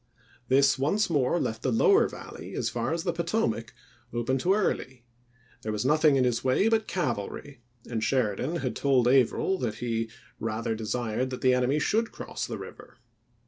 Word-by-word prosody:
This 135 +1 +4
once 175 +8 +1
more 145 +2 +2
left 110 - -2
the - - 0
lower 395 - +5
Valley, - - -9
as - - -1
far - - -2
as 165 0 -1
the 175 -3 -1
Potomac, 165 - -1 0.4
open 120 +3 -1
to 185 +8 +3
Early; 130 - -2 0.6
there 110 - -3
was 105 +3 -2
nothing 150 +1 +4
in 130 - +3
his 120 -1 0
way 130 +11 +3
but 225 -1 +1
cavalry, 130 - -3 0.3
and 115 -2 -3
Sheridan 125 - 0
had 170 - -2
told 130 -4 +2
Averill 135 +9 +3
that 115 -4 -2
he 115 -1 -2 0.2
" - - -29
rather 115 +1 -2
desired 115 +2 -2
that 130 - -6
the 130 -1 +4
enemy 125 +3 +2
should 225 +8 +1
cross - - -5
the - - -5
river." - - -11
130 Hz, 180 wpm, -27 LUFS, 115-165 Hz, 0.6 s, lower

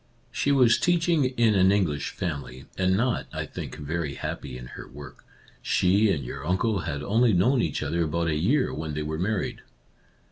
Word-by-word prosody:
She 140 - 0
was 125 -5 +5
teaching 170 -4 +2
in 120 -4 +2
an 95 -1 +4
English 85 -8 0
family, 65 -7 -5
and 95 0 +2
not, 120 +2 0
I - - -4
think, - - -7
very 75 -1 -3
happy 60 - -5
in 60 - -9
her - - -9
work. 70 0 -12 0.4
She 100 +4 +3
and 70 -8 -2
your 65 +2 -6
uncle 95 +6 0
had 75 -3 -4
only 110 +5 +3
known 120 +9 +3
each 75 -4 -2
other 85 +3 0
about 85 +2 -1
a 80 - +1
year 100 - +1
when 75 -1 -4
they 75 - -2
were 80 +1 -4
married. 100 +2 -2
90 Hz, 185 wpm, -26 LUFS, 75-110 Hz, 0.4 s, was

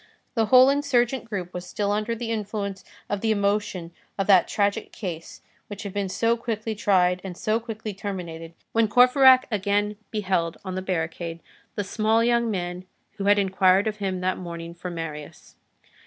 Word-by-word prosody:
The 225 -2 +1
whole 255 +3 +7
insurgent 265 -3 +1
group 190 -5 -5
was 180 - -5
still 205 +2 -1
under 215 +3 -1
the 230 0 -4
influence 205 -3 -3 0.2
of 205 -1 -2
the 225 - 0
emotion 200 -4 0 0.3
of 195 - 0
that 185 -3 +5
tragic 205 +1 -1
case 170 -6 -7 0.2
which 205 0 -7
had 200 -2 -6
been 200 -2 -2
so 230 +5 +1
quickly 225 -1 -3
tried 185 -3 +2
and 185 -2 -7
so 220 0 0
quickly 220 -2 -6
terminated, 170 -5 -6 0.2
when 225 -1 +3
Courfeyrac 255 +3 +6
again 205 0 0
beheld 185 -6 -1
on 185 - -4
the 185 - -3
barricade, 170 -2 -3 0.4
the 205 - -1
small 220 +3 +1
young 235 0 +2
man 180 -2 -3 0.3
who 200 - -3
had 205 0 +5
inquired 190 0 +3
of 215 -1 -2
him 190 -3 -2
that 185 0 -1
morning 170 -1 -7
for 175 +1 -7
Marius. 165 -3 -7
200 Hz, 170 wpm, -25 LUFS, 185-220 Hz, 0.4 s, whole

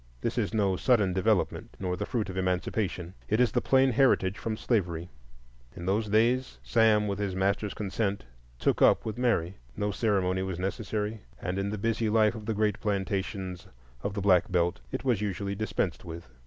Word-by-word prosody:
This - - -1
is - - 0
no 100 -4 +2
sudden 105 -7 +3
development, 95 0 0
nor 90 -2 -1
the - - -4
fruit 115 -6 -1
of - - -9
Emancipation. 90 -1 -1 0.2
It 110 - +2
is 125 -3 +4
the - - +1
plain 135 0 +4
heritage 110 -7 +3
from 110 -1 -3
slavery. 90 -8 -1 0.7
In 85 - -7
those 105 +4 +1
days 120 +5 +2
Sam, 110 -2 +3
with 100 0 -2
his 100 -2 -2
master's 100 +2 0
consent, 100 - -2 0.3
"took - - +1
up" - - +5
with 110 +2 -4
Mary. 100 -7 +1 0.2
No 105 0 0
ceremony 95 -3 +1
was 95 -2 -3
necessary, 105 +2 -3 0.2
and 90 +2 -2
in 100 +1 -1
the 105 - -3
busy 110 +1 0
life 110 0 +4
of 110 -2 -8
the 110 - 0
great 105 -1 +1
plantations 95 -2 -2 0.3
of 100 +6 -3
the 100 - -2
Black 95 -2 +4
Belt 85 -6 +1
it - - -3
was 120 -6 +1
usually 100 -1 -2
dispensed 100 -3 -2
with. 85 -3 -8
100 Hz, 185 wpm, -29 LUFS, 95-110 Hz, 0.7 s, up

